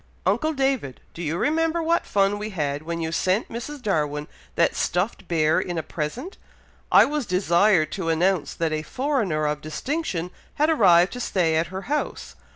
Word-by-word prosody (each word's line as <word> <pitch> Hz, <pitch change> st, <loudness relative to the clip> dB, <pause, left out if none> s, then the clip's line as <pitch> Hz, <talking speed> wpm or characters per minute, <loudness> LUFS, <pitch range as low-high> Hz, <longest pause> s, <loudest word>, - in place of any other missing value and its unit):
"Uncle 315 Hz, 0 st, +1 dB
David! 270 Hz, -, -1 dB
Do 170 Hz, -, -8 dB
you 165 Hz, 0 st, -2 dB
remember 325 Hz, -, +1 dB
what 335 Hz, +1 st, +1 dB
fun 200 Hz, +1 st, +2 dB
we 210 Hz, +1 st, -4 dB
had, 145 Hz, -7 st, -2 dB
when 170 Hz, +1 st, -4 dB
you 160 Hz, 0 st, -2 dB
sent 185 Hz, +5 st, 0 dB
Mrs. 250 Hz, +4 st, -7 dB
Darwin 150 Hz, -6 st, -1 dB, 0.3 s
that -, -, +2 dB
stuffed 185 Hz, +1 st, -1 dB
bear 160 Hz, -2 st, +2 dB
in 175 Hz, -1 st, -3 dB
a 160 Hz, -, -1 dB
present! 235 Hz, -, -5 dB, 0.5 s
I -, -, +8 dB
was 295 Hz, -5 st, -2 dB
desired 180 Hz, -2 st, +3 dB
to 185 Hz, -4 st, -3 dB
announce 175 Hz, +1 st, +1 dB
that 165 Hz, -2 st, -1 dB
a 155 Hz, -, -1 dB
foreigner 220 Hz, -, -1 dB
of 150 Hz, 0 st, -1 dB
distinction 180 Hz, -, -3 dB, 0.2 s
had 305 Hz, +2 st, +2 dB
arrived 180 Hz, -, +5 dB
to 250 Hz, -, -6 dB
stay 175 Hz, -8 st, +1 dB
at 160 Hz, +1 st, +1 dB
her 190 Hz, +3 st, -6 dB
house. 295 Hz, +3 st, -3 dB
185 Hz, 175 wpm, -24 LUFS, 160-255 Hz, 0.5 s, I